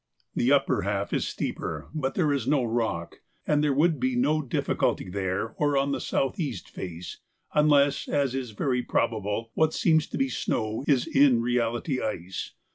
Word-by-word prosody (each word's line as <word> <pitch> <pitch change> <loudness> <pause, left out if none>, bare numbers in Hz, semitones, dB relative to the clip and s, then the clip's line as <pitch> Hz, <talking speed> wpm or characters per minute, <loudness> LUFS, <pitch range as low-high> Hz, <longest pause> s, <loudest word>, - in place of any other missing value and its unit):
The 125 - +2
upper 140 -6 +3
half 100 +1 -2
is - - 0
steeper, 80 -1 -4
but 135 -4 -2
there 155 -5 +2
is 130 -4 -2
no 140 -2 +3
rock, 115 -8 -2 0.2
and 150 0 +2
there 150 - +3
would 155 +2 +2
be 130 0 0
no 150 +5 +2
difficulty 135 -7 -1
there 95 +3 -2
or 145 -2 +2
on 140 +1 +1
the - - -2
south 135 +9 -1
east 145 -8 -3
face, 90 -1 -7 0.3
unless, 145 -2 +3
as 140 -3 +1
is 130 -2 -3
very 125 +4 -1
probable, 115 -2 -1
what 160 0 +2
seems 160 -2 +3
to - - -5
be 135 - +2
snow 110 -2 -2
is 135 -4 +3
in 135 -3 +4
reality 120 +3 0
ice. 95 -3 -4
130 Hz, 175 wpm, -27 LUFS, 110-145 Hz, 0.3 s, in